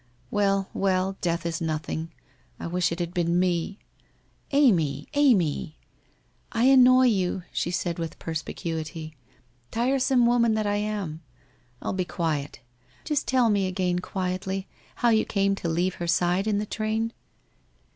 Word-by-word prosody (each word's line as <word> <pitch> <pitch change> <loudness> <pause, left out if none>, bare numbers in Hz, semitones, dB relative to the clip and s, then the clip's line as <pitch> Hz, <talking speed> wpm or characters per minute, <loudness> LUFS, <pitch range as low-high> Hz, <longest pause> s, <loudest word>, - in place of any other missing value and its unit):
Well, 195 -1 +1
well, 190 0 +1
death 170 -1 -1
is 165 0 -2
nothing. 160 0 -3 0.5
I - - -6
wish 175 0 0
it 170 - -3
had 175 0 -3
been 175 0 +1
me! 180 +1 0 0.3
' - - -38
' - - -39
Amy! 215 - +3
Amy! 195 - +2 0.2
' - - -39
' - - -39
I 230 - 0
annoy 255 -1 +7
you/ 190 -5 +1
said 175 0 -1
she, - - -4
with 165 -2 -5
perspicuity. 160 0 -5 0.3
' 120 -1 -38
Tiresome 255 0 +3
woman 235 -2 +3
I 205 -1 0
am! 205 -7 -3 0.6
I'll - - -2
be 185 -1 0
quiet. 150 -7 -3 0.4
Just 300 -3 -1
tell 250 -3 +3
me 200 -2 +2
again 180 -1 0
quietly, 190 +1 -3 0.3
how 240 - +2
you 220 -1 +4
came 200 -1 +1
to 180 -3 -3
leave 175 +3 0
her 170 - -2
side 175 +4 +2
in 210 -2 +1
the 210 - -1
train? 220 +2 -2
185 Hz, 155 wpm, -26 LUFS, 170-215 Hz, 0.6 s, annoy